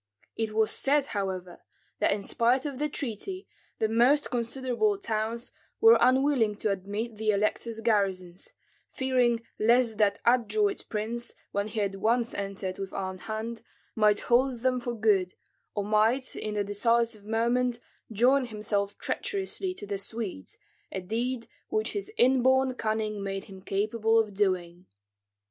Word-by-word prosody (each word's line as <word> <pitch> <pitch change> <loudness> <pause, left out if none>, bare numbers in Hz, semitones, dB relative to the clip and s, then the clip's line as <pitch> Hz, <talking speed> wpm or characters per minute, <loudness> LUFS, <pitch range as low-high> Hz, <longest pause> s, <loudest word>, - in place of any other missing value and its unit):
It 220 -1 -2
was 220 -1 +3
said, 285 0 +2
however, 185 -3 -4 0.4
that - - +3
in 200 0 -1
spite 245 +5 +2
of 280 -3 -4
the 300 0 0
treaty 290 - -4 0.3
the 220 - +1
most 245 +7 +3
considerable 255 - 0
towns 230 - -3 0.3
were 450 0 +7
unwilling 255 -3 +3
to 210 0 -1
admit 205 +4 -4
the 220 0 -1
elector's 215 +2 0
garrisons, 190 -5 -1 0.4
fearing 250 -3 +1 0.2
lest 230 0 +3
that 205 -1 +3
adroit 325 - +2
prince, 230 +3 -3 0.2
when 200 +1 -1
he 215 0 -2
had 200 -1 -1
once 230 +4 +1
entered 195 -1 -4
with 195 -1 -5
armed 185 -1 -4
hand, 225 +1 -5 0.3
might 210 -1 +4
hold 245 0 +2
them 255 0 +1
for 240 -1 -4
good, 205 -5 +2 0.4
or 205 - 0
might 220 +5 +2
in 215 -1 -4
the 205 - +1
decisive 225 +2 +1
moment 235 +3 0 0.3
join 255 +5 +3
himself 205 -2 -2
treacherously 385 -1 -2
to - - -5
the 200 -1 -3
Swedes, 200 - -3 0.3
a - - -3
deed 230 +6 -2 0.2
which 435 0 0
his 405 0 -4
inborn 260 +1 +4
cunning 215 -3 -2
made 195 0 -3
him 190 -2 -12
capable 215 +3 +1
of 215 -2 +1
doing. 185 -3 -1
225 Hz, 145 wpm, -28 LUFS, 205-250 Hz, 0.4 s, were